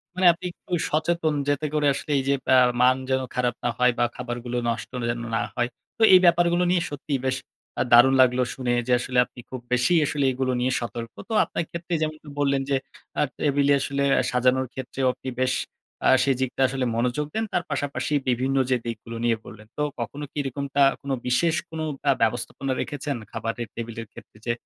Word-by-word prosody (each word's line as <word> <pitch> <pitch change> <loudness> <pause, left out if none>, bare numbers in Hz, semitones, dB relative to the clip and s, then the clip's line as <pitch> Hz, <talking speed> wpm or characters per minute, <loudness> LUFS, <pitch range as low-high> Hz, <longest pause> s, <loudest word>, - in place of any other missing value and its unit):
মানে 185 0 +1
আপনি 175 - -11
একটু - - -22 0.2
সচেতন। 160 0 +1 0.2
যেতে 145 +2 0
করে 150 -1 +2
আসলে 145 - -5
এই 135 - 0
যে 140 - +4 0.2
আ - - +7 0.2
মান 130 +1 +6
যেন 130 0 +2
খারাপ 125 -1 0
না 120 - +1
হয় 125 0 +4
বা 120 - +4
খাবারগুলো 120 0 -4
নষ্ট 115 - -4 0.2
যেন 120 0 -2
না - - +1
হয়। 120 - +1 0.3
তো - - -8
এই 185 - +10
ব্যাপারগুলো 175 +1 +4
নিয়ে 180 - +3
সত্যিই 145 -1 -3
বেশ 130 0 +1 0.4
আ - - +3
দারুণ 120 +3 +8
লাগলো 125 0 +4
শুনে। 125 -2 -1
যে - - 0
আসলে 125 0 -3
আপনি - - -16
খুব 130 - -5
বেশি 125 +7 +3
আসলে 145 -1 -1
এগুলো 130 0 -1
নিয়ে 130 +1 +1
সতর্ক। 115 -1 -6 0.2
তো 225 - -2
আপনার - - -3
ক্ষেত্রে 170 +1 -5
যেমনটি 155 -1 -4
বললেন, 140 -1 +2
যে 140 - +2 0.4
আ - - +3 0.2
টেবিলে 145 -1 +2
আসলে 140 +1 -1 0.3
সাজানোর 125 +1 +2
ক্ষেত্রে 130 0 -7
আপনিও 130 0 -7
বেশ, 130 0 +2 0.5
আ - - +6
সেদিকটা 130 -1 0
আসলে 130 -1 -2
মনোযোগ 125 +5 0
দেন। 220 - +1
তার 175 - +1
পাশাপাশি 145 +1 -2
বিভিন্ন 130 +2 +1
যে 130 - +4
দিকগুলো 115 0 -6
নিয়ে 115 -1 +2
বললেন। 110 0 -12
তো - - -1 0.2
কখনো 145 +1 -5
কি - - -12
এরকমটা 140 +1 -2 0.2
কোনো 140 -1 -3
বিশেষ 160 +7 +2
কোনো 160 -1 -4 0.3
আ - - +7
ব্যবস্থাপনা 120 +4 -1
রেখেছেন 145 0 -3 0.2
খাবারের 115 +1 -4
টেবিলের 115 -1 -6
ক্ষেত্রে? 110 -2 -14
যে 120 - +1
130 Hz, 190 wpm, -25 LUFS, 125-145 Hz, 0.5 s, এই